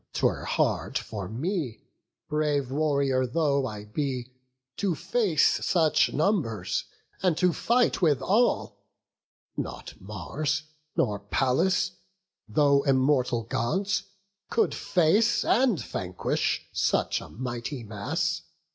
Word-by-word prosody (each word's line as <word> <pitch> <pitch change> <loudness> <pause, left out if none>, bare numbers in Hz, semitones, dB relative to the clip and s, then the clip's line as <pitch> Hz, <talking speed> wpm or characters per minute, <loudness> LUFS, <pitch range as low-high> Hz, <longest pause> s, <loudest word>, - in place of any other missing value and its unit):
'Twere - - 0
hard - - 0
for 100 -5 -5
me, 135 - -3 0.5
brave 145 -3 0
warrior 140 -3 +1
though 140 0 +1
I 105 -2 -7
be, 130 +1 -3 0.4
To 195 -5 0
face 200 -6 +2
such 160 -4 +3
numbers, 155 - 0 0.4
and 180 -4 +2
to 180 -1 +3
fight 240 +4 +2
with 150 -6 +4
all: 225 +6 +1 0.7
Not - - -5
Mars, 140 - -3 0.3
nor 105 -4 +1
Pallas, 160 - +1 0.6
though 140 +4 +4
immortal 130 -3 +2
Gods, 160 - 0 0.5
Could 445 - +2
face, 195 +7 +2
and 245 - +3
vanquish, 90 -1 -2
such - - +1
a - - -10
mighty 120 +2 -5
mass. 105 -2 -2
140 Hz, 105 wpm, -27 LUFS, 120-175 Hz, 0.7 s, with